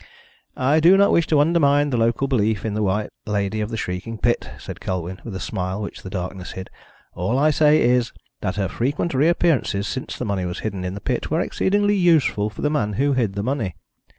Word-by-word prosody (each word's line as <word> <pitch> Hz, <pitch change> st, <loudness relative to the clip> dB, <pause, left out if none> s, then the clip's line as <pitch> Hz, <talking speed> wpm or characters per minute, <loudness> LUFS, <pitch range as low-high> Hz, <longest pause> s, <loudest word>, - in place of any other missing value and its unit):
"I 140 Hz, +5 st, +3 dB
do 175 Hz, +5 st, +6 dB
not 200 Hz, +1 st, +5 dB
wish 170 Hz, -, +3 dB
to 150 Hz, -, +3 dB
undermine 145 Hz, -2 st, +3 dB
the -, -, 0 dB
local 115 Hz, +4 st, +1 dB
belief 110 Hz, -5 st, 0 dB
in 110 Hz, -, -2 dB
the 105 Hz, -, -1 dB
White 105 Hz, +1 st, 0 dB, 0.2 s
Lady 105 Hz, +1 st, -1 dB
of 105 Hz, -, -2 dB
the 115 Hz, -, -4 dB
Shrieking 90 Hz, +4 st, -4 dB
Pit," 120 Hz, +2 st, 0 dB
said -, -, -9 dB
Colwyn, 90 Hz, 0 st, -4 dB
with 110 Hz, -5 st, -7 dB
a -, -, -4 dB
smile 95 Hz, +1 st, -3 dB
which 105 Hz, -, -6 dB
the 95 Hz, -, -8 dB
darkness 90 Hz, -1 st, -5 dB
hid. 95 Hz, 0 st, -8 dB, 0.4 s
"All 100 Hz, +9 st, -1 dB
I 150 Hz, +3 st, +4 dB
say 150 Hz, +1 st, +4 dB
is 120 Hz, 0 st, +2 dB, 0.3 s
that 95 Hz, -, -2 dB
her 100 Hz, -2 st, 0 dB
frequent 140 Hz, -, -2 dB
reappearances 140 Hz, -, +2 dB
since 130 Hz, -, -5 dB
the 125 Hz, -, -3 dB
money 100 Hz, -3 st, -1 dB
was 90 Hz, 0 st, -4 dB
hidden 100 Hz, -4 st, -4 dB
in 90 Hz, +1 st, -4 dB
the 100 Hz, -, -7 dB
pit 125 Hz, -, -2 dB
were 160 Hz, -, +1 dB
exceedingly 205 Hz, +3 st, +1 dB
useful 160 Hz, -, +3 dB
for 105 Hz, -, -9 dB
the 150 Hz, -, +2 dB
man 105 Hz, -8 st, 0 dB
who 140 Hz, +6 st, +1 dB
hid 115 Hz, -7 st, 0 dB
the 100 Hz, 0 st, -3 dB
money. 115 Hz, -, -2 dB
115 Hz, 220 wpm, -22 LUFS, 100-145 Hz, 0.4 s, do